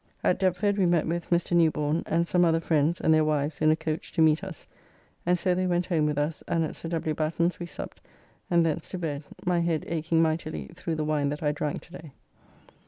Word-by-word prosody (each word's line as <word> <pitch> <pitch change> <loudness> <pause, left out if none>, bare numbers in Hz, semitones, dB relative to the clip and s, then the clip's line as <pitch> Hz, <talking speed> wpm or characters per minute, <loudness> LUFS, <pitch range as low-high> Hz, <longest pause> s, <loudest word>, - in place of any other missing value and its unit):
At - - +2
Deptford 200 +2 +1
we 185 - +4
met 170 -2 +2
with 170 +1 -3
Mr. 175 0 +1
Newborne, 155 -1 +2
and 170 +1 +1
some 180 0 +3
other 165 -1 +3
friends 160 0 +1
and 160 - +3
their 155 0 +4
wives 150 -1 -1
in 155 - +5
a 155 - +5
coach 160 -1 -4
to 165 - +1
meet 155 +3 +3
us, 190 -4 -8 0.6
and 180 0 +4
so 180 +1 +1
they 185 +1 0
went 175 0 +1
home 160 -5 +1
with 150 -1 -1
us, 150 +1 -1
and 165 -1 +1
at 155 - -4
Sir 165 - -6
W. 160 -2 -1
Batten's 165 +3 0
we 175 - -5
supped, - - -7 0.5
and 170 -1 +4
thence 160 0 -2
to 185 - -4
bed, 150 -5 -3 0.2
my 175 -1 +2
head 170 -2 0
akeing 165 0 0
mightily 155 - -1
through 165 - -4
the 155 -1 -2
wine 150 -2 +1
that 150 +2 -4
I 150 - +2
drank 150 0 -3
to - - -19
day. 160 -4 -10
165 Hz, 235 wpm, -27 LUFS, 155-175 Hz, 0.6 s, in